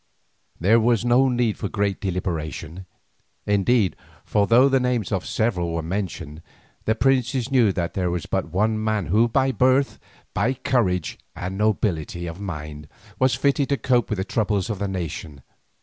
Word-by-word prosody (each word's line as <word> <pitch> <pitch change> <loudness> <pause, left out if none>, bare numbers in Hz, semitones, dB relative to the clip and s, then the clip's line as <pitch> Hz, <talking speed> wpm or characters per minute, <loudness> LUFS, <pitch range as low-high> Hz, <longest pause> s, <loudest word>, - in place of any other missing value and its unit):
There 105 +7 +4
was 115 0 +2
no 125 +2 +4
great 125 - -1
need 115 -3 +1
of 100 -1 -1
deliberation, 90 -1 -4 0.6
indeed, 105 0 +2 0.3
for 100 -1 +1
though 125 +4 +6
the 135 -1 +3
names 125 -5 -1
of 95 -3 -2
several 90 -7 0
were 85 - -2
mentioned, 85 -4 -4 0.4
the 110 - +2
princes 130 -1 +1
knew 120 -6 +4
that 85 -1 -2
there 90 -2 0
was 85 -2 -3
but 75 - -2
one 110 +5 0
man 110 -3 0
who 105 +9 +3
by 135 +3 +2
birth, 130 +2 +2 0.3
by 115 +7 +1
courage, 95 -10 0 0.2
and 95 +2 -5
nobility 95 -5 -1
of 85 +3 -7
mind, 75 -5 -6 0.3
was 130 -2 +3
fitted 140 +1 +1
to 140 - +1
cope 125 -2 +1
with 105 - -1
the 95 - -1
troubles 105 0 0
of 100 - -4
the 100 - -1
nation. 80 -7 -5
105 Hz, 165 wpm, -23 LUFS, 90-120 Hz, 0.6 s, though